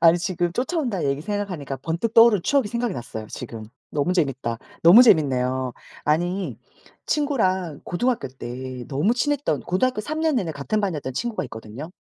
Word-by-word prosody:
아니 165 +1 +6
지금 175 -1 -1
쫓아온다는 250 - -1
얘기 140 +1 -2
생각하니까 180 -8 -3
번뜩 170 - -2
떠오른 225 -5 +7
추억이 270 0 +2
생각이 235 0 -1
났어요. 110 -3 -6
지금. 110 -2 -7 0.3
너무 150 +5 0
재밌다. 135 -9 -1 0.2
너무 185 +9 +9
재밌네요. 130 - +3 0.3
아니 175 +5 0 0.5
친구랑 190 - 0
고등학교 240 - -1
때 130 0 -7
너무 155 - +1
친했던 280 - 0
고등학교 250 +5 0
3 310 +5 -3
년 320 -2 +2
내내 175 -8 -1
같은 150 +10 -1
반이었던 150 -10 -2
친구가 235 - -2
있거든요. 110 +9 -8
175 Hz, 390 characters per minute, -23 LUFS, 135-230 Hz, 0.5 s, 너무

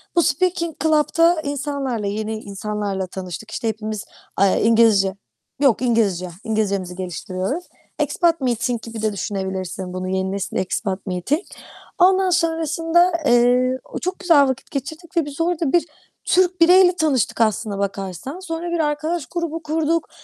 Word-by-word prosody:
Bu 340 - +5
speaking 335 -1 0
club'ta 320 +2 +3
insanlarla, 280 -6 -3
yeni 215 +1 -3
insanlarla 200 -2 -4
tanıştık. 185 +3 -7
İşte, 230 - -3
hepimiz, 215 -1 -4 0.3
aaa, 195 0 +4
İngilizce 220 -4 +4 0.4
yok 270 -5 +3
İngilizce, 205 -7 +1
İngilizcemizi 200 -5 -1
geliştiriyoruz. 185 - -4 0.3
Expat 335 -4 +1
meeting 240 -2 0
gibi 225 -1 -7
de 215 -1 0
düşünebilirsin 190 -1 -4
bunu, 185 0 -4
yeni 190 0 -1
nesil 200 0 -3
expat 190 +1 -2
meeting. 185 - -1 0.6
Ondan 375 +1 +5
sonrasında, 330 +1 +2
eee, 250 +1 +3 0.2
çok 365 +2 -3
güzel 310 -7 +5
vakit 260 0 -4
geçirdik 315 +6 -6
ve 325 - +3
biz 290 +2 -5
orada 335 -4 0
bir 345 - +4 0.4
Türk 365 -1 +2
bireyle 360 +1 +7
tanıştık 275 - +1
aslına 215 -2 +1
bakarsan. 195 - -4
Sonra 345 -1 -4
bir 340 - -1
arkadaş 310 +1 -1
grubu 330 -2 -4
kurduk. 320 +1 0
255 Hz, 135 wpm, -21 LUFS, 200-330 Hz, 0.6 s, bireyle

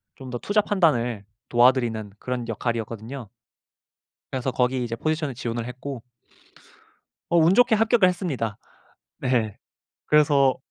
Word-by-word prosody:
좀 130 -1 -10
더 120 - -3
투자 210 +1 +1
판단을 125 - +1 0.3
도와드리는 120 -4 +3
그런 125 -2 -3
역할이었거든요. 115 +1 -4 1.0
그래서 130 0 -1
거기 125 0 0
이제 115 -1 -3
포지션을 155 -2 -2
지원을 120 -1 -4
했고 125 0 -7 1.3
어 170 - +3
운 165 +3 +5
좋게 245 0 +5
합격을 220 -2 +4
했습니다. 140 - -2 0.6
네. 115 -5 0 0.5
그래서 145 -3 +4
130 Hz, 290 characters per minute, -24 LUFS, 115-155 Hz, 1.3 s, 운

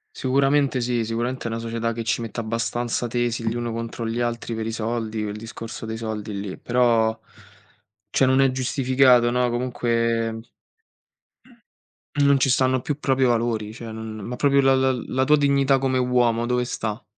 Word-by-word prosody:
Sicuramente 135 +1 +2
sì, 120 -1 0
sicuramente 120 +3 -3
è - - 0
una 115 0 -3
società 115 0 -2
che 115 0 -4
ci 110 0 -1
mette 115 0 -5
abbastanza 115 +2 -2
tesi 120 -1 -1
gli 115 - -3
uni 120 -1 -3
contro 115 0 -4
gli 115 +1 -2
altri 120 -1 -2
per 110 0 -3
i - - -2
soldi, 115 -1 -3
il 105 -1 -3
discorso 115 +1 -8
dei 110 0 -4
soldi 110 -2 -5
lì, 100 -1 -5
però, 115 -2 +2 0.9
cioè 135 - +3
non 130 +1 +3
è 135 - +5
giustificato 130 -1 +3
no, 125 0 +1
comunque 115 -2 -1 1.7
non 140 -1 +4
ci 135 - +3
stanno 130 0 +2
più 145 +3 -4
proprio 135 -2 +2
i - - +3
valori, 115 -2 -1
cioè 115 0 -8
non, 110 0 -7
ma 115 +4 -6
proprio 140 +2 +3
la 135 0 +4
la 130 0 +2 0.2
la 130 - 0
tua 150 +3 +5
dignità 140 -2 +3
come 130 -1 0
uomo, 120 -2 +2
dove 125 0 +1
sta? 110 -1 -4
120 Hz, 180 wpm, -23 LUFS, 115-130 Hz, 1.7 s, è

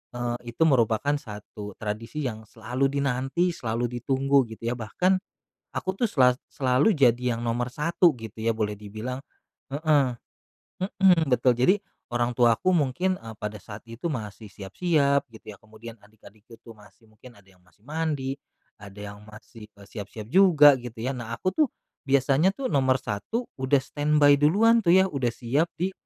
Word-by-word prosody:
eee, 120 -1 -4
itu 160 - +2
merupakan 125 -2 +2
satu 105 -3 -9
tradisi 115 +7 -5
yang 110 -3 -5
selalu 125 +5 -2
dinanti, 140 +6 0
selalu 120 -3 -3
ditunggu 135 +1 +2
gitu 115 +2 -4
ya. - - 0
Bahkan 180 - +1 0.5
aku 190 - -4
tuh 240 - +1
sela 125 - +3
selalu 130 +10 +2
jadi 125 -5 +2
yang 115 - -6
nomor 120 +1 -2
1 170 +2 +2
gitu 110 -3 -10
ya 115 +1 0
boleh 105 -2 -2
dibilang 110 +5 -6 0.6
heeh. 145 -4 +2 0.7
Mhm, 185 -5 +3
betul. 125 0 +3
Jadi 130 - +3 0.3
orang 120 0 -1
tuaku 120 +9 +3
mungkin, 175 +5 0
eee, 115 -1 -9
pada 105 0 -6
saat 105 +1 -11
itu 115 +8 -6
masih 110 -5 -6
siap-siap 140 - 0
gitu 110 -1 -16
ya. 100 - -16
Kemudian 110 +1 -12
adik-adikku 110 +1 -18
tuh 115 - -11 0.3
mungkin 110 +1 -17
ada 100 - -20
yang 95 -1 -24
masih 95 +3 -30
mandi, 145 -3 -3 0.4
ada 100 -1 -12 0.2
yang 105 - -14
masih, 110 0 -13
eee, 100 -1 -17
siap-siap 105 +2 -9
juga 150 -8 +6
gitu 120 -1 -9
ya. 130 - -1
Nah 115 -3 -6
aku 185 - -1
tuh 305 +3 +2 0.4
biasanya 140 +7 +3
tuh 270 -7 -3
nomor 130 -2 +3
1 130 - -4 0.2
udah 130 +2 +3
standby 145 0 +3
duluan 225 +10 +4
tuh. 175 -3 +3
Ya 190 - +6
udah 135 -6 -1
siap 130 +8 -1
di 185 +3 -2
125 Hz, 165 wpm, -25 LUFS, 110-150 Hz, 0.7 s, juga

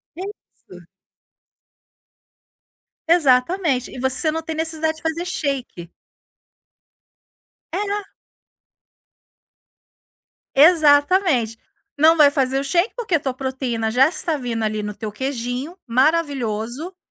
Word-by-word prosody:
Isso. 350 - -11 2.2
Exatamente. 285 -2 +2
E 255 - -9
você 265 +5 +1
não 325 +1 -3
tem 320 0 -6
necessidade 320 0 -1
de - - -17
fazer 325 +2 -2
shake. 270 - -4 1.8
É 415 - -2
na 410 0 -3 2.5
Exatamente, 290 - +4 0.4
não 320 +2 +6
vai 295 -2 +6
fazer 270 -1 0
o 275 - -3
shake, 345 - 0
porque 440 -8 -1
a - - +2
tua 265 -3 -3
proteína 255 -4 -3
já 255 +4 +5
está 325 -1 -2
vindo 235 -4 -3
ali, 215 0 -1
no 210 0 -5
teu 215 -2 -6
queijinho, 260 - -4
maravilhoso, 265 - -1
280 Hz, 105 wpm, -21 LUFS, 250-325 Hz, 2.5 s, não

